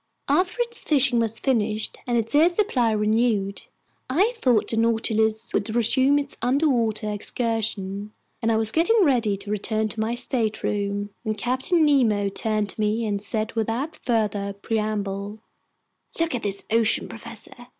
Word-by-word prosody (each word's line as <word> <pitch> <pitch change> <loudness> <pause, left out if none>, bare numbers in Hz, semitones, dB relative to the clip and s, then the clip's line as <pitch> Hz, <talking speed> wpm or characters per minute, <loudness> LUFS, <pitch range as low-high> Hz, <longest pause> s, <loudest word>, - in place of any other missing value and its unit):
After 365 +6 +1
its 470 0 -3
fishing 270 -5 +3
was 225 -1 +1
finished 215 -4 -1
and 240 -1 +1
its 230 +2 -1
air 310 +4 +6
supply 345 - +1
renewed, 210 -2 0 0.4
I 385 - +2
thought 235 - +2
the - - 0
Nautilus 225 -1 +1
would 220 +2 -1
resume 260 +4 +3
its 280 -1 -2
underwater 235 -5 +1
excursion, 210 -2 -2 0.3
and 230 -1 +1
I 220 - +2
was 220 0 +1
getting 395 - +3
ready 235 - +2
to 200 +1 -7
return 215 +1 -1
to 220 - -6
my 220 +2 -1
stateroom, 205 -4 -1
when 215 -2 -2
Captain 260 - +1
Nemo 225 -9 +3
turned 215 +1 -1
to 215 - -4
me 215 +2 0
and 205 -2 -2
said 215 +1 -2
without 230 +7 -2
further 210 -4 -1
preamble: 205 -1 -3 0.8
"Look 330 0 0
at 245 - -2
this 200 -1 -3
ocean, 225 -1 +2
professor! 230 +1 -10
225 Hz, 150 wpm, -24 LUFS, 210-250 Hz, 0.8 s, air